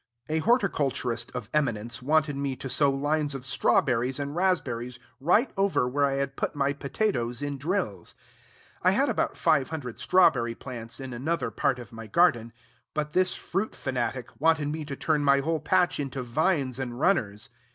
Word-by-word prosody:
A 160 +1 +1
horticulturist 155 - 0
of 125 -4 -4
eminence 120 -7 0
wanted 150 +2 +2
me 140 -1 -2
to 135 - -6
sow 140 +2 +3
lines 145 +1 0
of 130 -1 -7
straw 140 +1 +3
berries 125 +1 -1
and 145 +1 -4
raspberries 125 -10 0 0.2
right 180 - +3
over 195 -10 +2
where 140 +3 +1
I 140 - 0
had 140 0 -2
put - - -2
my 140 0 +1
potatoes 140 - -2
in 145 -1 -3
drills. 140 - -3 0.7
I - - +4
had - - +3
about - - -1
five 135 - +2
hundred 140 -7 -6
strawberry 160 -11 +3
plants 120 -2 -7
in 130 -1 -6
another 155 +8 -2
part 140 -3 +1
of 120 -2 -11
my 115 -1 -8
garden; 120 - +3 0.4
but 150 0 -2
this 185 0 +2
fruit 195 +5 -3
fanatic 125 -2 -3
wanted 155 -2 +3
me 155 0 -4
to 140 -1 -5
turn 150 +1 0
my 140 -1 +5
whole 160 +3 0
patch 180 +3 +2
into 135 -2 -3
vines 135 0 0
and 120 -2 -4
runners. 115 - +1
140 Hz, 175 wpm, -27 LUFS, 125-155 Hz, 0.7 s, my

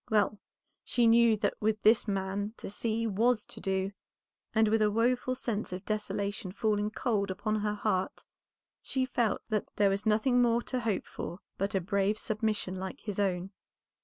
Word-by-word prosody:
Well 210 -1 +2 0.4
she 240 - +2
knew 230 -1 +6
that 205 -1 0
with 215 0 +1
this 225 +1 +5
man 200 +2 -2
to - - -7
see 225 +2 -1
was 225 +2 +2
to - - -10
do, 190 0 -1 0.6
and 220 0 +3
with 220 +1 +2
a 210 - +4
woeful 245 +4 +1
sense 230 -6 -3
of 185 0 -6
desolation 205 -2 -2
falling 210 0 0
cold 215 -3 -1
upon 215 +3 -1
her 210 0 -1
heart, 205 -3 -1 0.6
she 260 -1 0
felt 240 -4 0
that 215 -2 0
there 200 -1 +4
was 200 +3 -1
nothing 245 +4 +3
more 235 0 +3
to 255 - -2
hope 225 -5 -1
for 175 - -6 0.2
but 195 +1 -1
a - - +3
brave 200 +3 +1
submission 215 -3 -1
like 190 0 -6
his 205 -2 -4
own. 190 -1 0
210 Hz, 175 wpm, -30 LUFS, 200-225 Hz, 0.6 s, knew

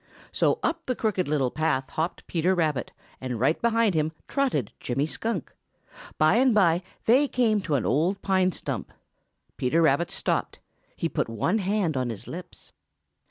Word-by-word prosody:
So - - +2
up 330 0 -1
the 255 - 0
Crooked 205 -6 0
Little 140 -4 +1
Path 145 -4 -1
hopped 160 +3 -3
Peter 180 +2 +1
Rabbit, 155 -7 0 0.3
and 125 -3 -3
right 140 +7 +2
behind 230 -3 +3
him 155 0 0
trotted 255 - 0
Jimmy 135 +4 -1
Skunk. 195 - -3 0.6
By 155 +8 +4
and 255 -2 +4
by 175 -4 +4 0.2
they 265 +6 +5
came 225 -6 +2
to 155 -5 -1
an 130 - 0
old 165 - +1
pine 185 -1 +2
stump. - - -5 0.7
Peter 130 +6 +1
Rabbit 160 +1 +3
stopped. - - -1 0.4
He - - -1
put - - -2
one 165 - 0
hand 195 -5 0
on 130 -2 -1
his 115 -4 -7
lips. - - -9
170 Hz, 160 wpm, -26 LUFS, 145-215 Hz, 0.7 s, they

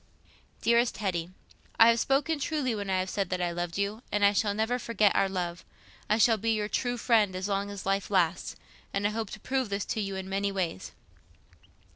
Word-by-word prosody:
"DEAREST 235 +1 +3
HETTY—I 185 +4 0
have 230 0 +3
spoken 290 +5 +1
truly 285 -4 -1
when 205 -2 -4
I 190 - +2
have 185 0 -1
said 195 -3 -1
that 185 - -1
I 175 -1 0
loved 175 0 -4
you, 200 +3 -2
and 205 -1 +3
I 200 - +5
shall 205 0 +1
never 225 +4 0
forget 215 -4 +2
our 195 - +3
love. 175 -2 -3 0.5
I 215 - +3
shall 225 0 +4
be 225 +2 -2
your 210 -1 -1
true 245 +2 -1
friend 215 -5 +2
as 185 +1 -3
long 200 0 -1
as 200 -1 -7
life 195 0 0
lasts, 185 -3 +1 0.4
and 200 +1 0
I 205 - +2
hope 220 -1 -3
to 215 - -8
prove 260 +1 -1
this 200 0 -2
to 220 - -2
you 195 -1 -3
in 190 0 -5
many 200 +1 -1
ways. 180 - -3
200 Hz, 210 wpm, -28 LUFS, 190-225 Hz, 0.5 s, I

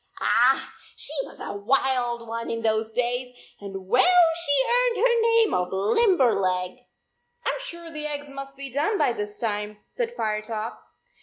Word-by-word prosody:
Ah! - - +3 0.2
She - - -3
was - - -14
a - - -5
wild 240 +2 0
one 230 +1 -4
in 230 0 -3
those 220 0 0
days, 245 +2 -1 0.3
and 195 -2 -7
well 335 - +5
she 285 -5 +2
earned - - +2
her 475 +1 +3
name 460 -1 +3
of 180 0 0
Limber 260 - +3
leg!" 185 +3 -1 0.3
" - - -40
I - - +2
m - - -5
sure 340 -9 -7
the 300 -1 -4
eggs 290 -1 -5
must 275 0 -9
be 275 -1 -7
done 300 - 0
by 245 - +2
this 210 -2 -5
time," 210 -2 -3
said 480 -1 -3
Firetop. 215 - -3
250 Hz, 170 wpm, -25 LUFS, 215-335 Hz, 0.3 s, well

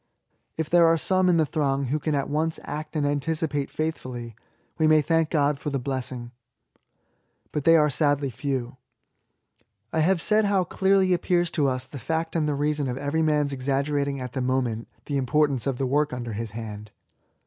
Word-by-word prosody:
If 160 -1 -1
there 170 +1 +5
are 165 0 +4
some 185 +2 +2
in 175 - +4
the 160 - +3
throng 140 -2 0
who 145 +5 -1
can 150 0 -1
at 140 - -1
once 160 +2 -1
act 155 +2 -6
and 150 -2 +1
anticipate 145 0 -1
faithfully, 125 -7 -4 0.4
we 155 - +4
may 155 0 +6
thank 165 +1 +1
God 145 -2 +1
for 150 - -3
the 140 - -1
blessing. 125 -2 -4 1.2
But 150 - -3
they 165 - +7
are 150 -1 +4
sadly 145 -2 +1
few. 135 +2 -2
80 - - -9
ESSAYS. 125 - -14 1.2
I 160 - +1
have 175 +2 +3
said 215 +3 +3
how 200 -2 +2
clearly 190 +1 +2
appears 175 -1 +1
to 140 -4 +1
tis 130 0 -3
the 140 - -9
fact 160 +5 -2
and 155 -2 +1
the 145 - 0
reason 145 0 0
of 125 0 -3
every 145 +3 -1
man^B 150 -2 +2
exaggeratii^ 140 +1 -1
at 125 -1 -6
the 130 - -2
moment 125 -3 -1 0.2
the 145 - -1
importance 140 0 +1
of 135 -3 -1
the 135 - -1
work 145 +2 +1
under 120 -2 -4
his 115 +2 -4
hand. 105 -1 -7
145 Hz, 195 wpm, -25 LUFS, 130-160 Hz, 1.2 s, they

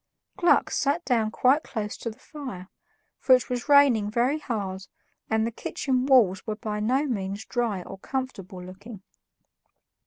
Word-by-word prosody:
Gluck 350 - +3
sat 295 +5 0
down 230 -4 +1
quite 260 +6 +3
close 210 -7 -5
to 230 - -4
the 220 - -11
fire, 255 - -9 0.5
for 260 - +6
it 250 0 -3
was 245 +3 -3
raining 270 -8 +5
very 245 +7 +1
hard 195 -8 -4 0.4
and 220 0 +2
the 230 - -2
kitchen 255 +2 -2
walls 220 -9 +5
were 215 - -2
by 210 0 -4
no 255 +7 +1
means 200 -5 -3
dry 230 -7 -1
or 195 - -10
comfortable 195 -8 -5
looking. 195 +3 -11
230 Hz, 155 wpm, -26 LUFS, 205-260 Hz, 0.5 s, for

